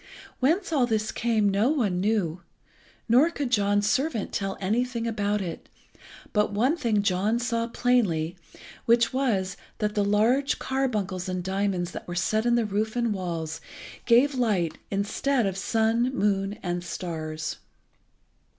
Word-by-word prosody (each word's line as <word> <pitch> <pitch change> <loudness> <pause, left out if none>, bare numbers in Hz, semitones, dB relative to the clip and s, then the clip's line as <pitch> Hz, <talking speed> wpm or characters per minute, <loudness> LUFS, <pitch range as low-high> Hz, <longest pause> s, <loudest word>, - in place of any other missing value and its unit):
Whence 330 +7 +1
all 260 -5 +3
this 215 -2 0
came 225 -3 +1
no 200 +5 +2
one 220 -12 +1
knew, 190 -5 0 0.7
nor 255 +8 +5
could 285 -6 -4
John's 205 -2 +2
servant 260 -2 0
tell 195 -1 -2
anything 235 +4 -1
about 210 -2 0
it, 170 -3 -7 0.6
but 210 -1 +2
one 245 +10 +2
thing 220 -10 +1
John 200 +3 +1
saw 235 -1 -1
plainly, 200 -10 +1 0.5
which 235 +1 +3
was, 200 -8 0 0.2
that 210 -1 -1
the 205 - +1
large 230 +8 +2
carbuncles 210 -9 -2
and 185 -1 -2
diamonds 190 -2 -1
that - - -8
were 175 - -5
set 215 +6 +1
in 240 - +4
the 235 -2 +2
roof 215 +2 -1
and 235 -3 +1
walls 165 -4 -4 0.5
gave 250 +5 +5
light 210 -10 0
instead 215 +6 0
of 195 - 0
the 195 - -5
sun, 225 +3 +1
moon, 200 -2 0
and 175 -1 -2
stars. 160 -3 -4
210 Hz, 150 wpm, -26 LUFS, 190-240 Hz, 0.7 s, nor